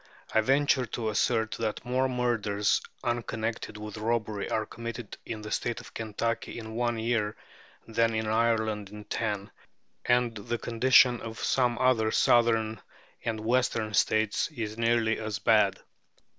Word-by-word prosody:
I 110 - +5
venture 135 +1 +2
to 110 0 -3
assert 110 +1 +1
that 110 -2 -2
more 130 +2 +1
murders 115 -5 +1 0.2
unconnected 115 -2 -3
with 105 0 -7
robbery 110 -2 -1
are 110 - 0
committed 115 0 -7
in 110 -2 -5
the 105 - -7
State 120 - -1
of - - -13
Kentucky 115 +2 -3
in 110 -1 -7
one 120 0 0
year 110 -2 0 0.5
than 115 0 +1
in 110 0 -1
Ireland 110 -2 +1
in 105 +1 -9
ten, 105 -1 -3 0.5
and 125 -1 +2
the 120 +3 -3
condition 120 +1 +4
of 115 0 -7
some 125 -2 +1
other 120 -4 +3
Southern 110 -2 +3 0.4
and 110 -2 -2
Western 115 -2 +1
States 110 0 +2
is 115 -9 -5
nearly 115 -1 +2
as 110 -2 -3
bad. 105 -3 +3
115 Hz, 145 wpm, -28 LUFS, 110-120 Hz, 0.5 s, I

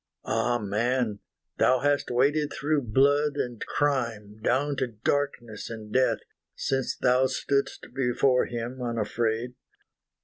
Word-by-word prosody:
Ah 120 +2 +1
man! 110 +1 0 0.4
thou 130 - +5
hast 145 0 +1
waded 145 +5 +2
through 150 +1 0
blood 140 +5 +3
And 120 -5 -3
crime 115 -7 -1
down 140 +5 +1
to 130 - 0
darkness 120 -1 -2
and 110 -2 -8
death, 130 0 +3 0.3
Since 135 -1 -1
thou 125 +1 +3
stood'st 140 -2 -2
before 125 0 +2
Him 120 +2 -5
unafraid. 115 0 -1
125 Hz, 115 wpm, -27 LUFS, 115-140 Hz, 0.4 s, thou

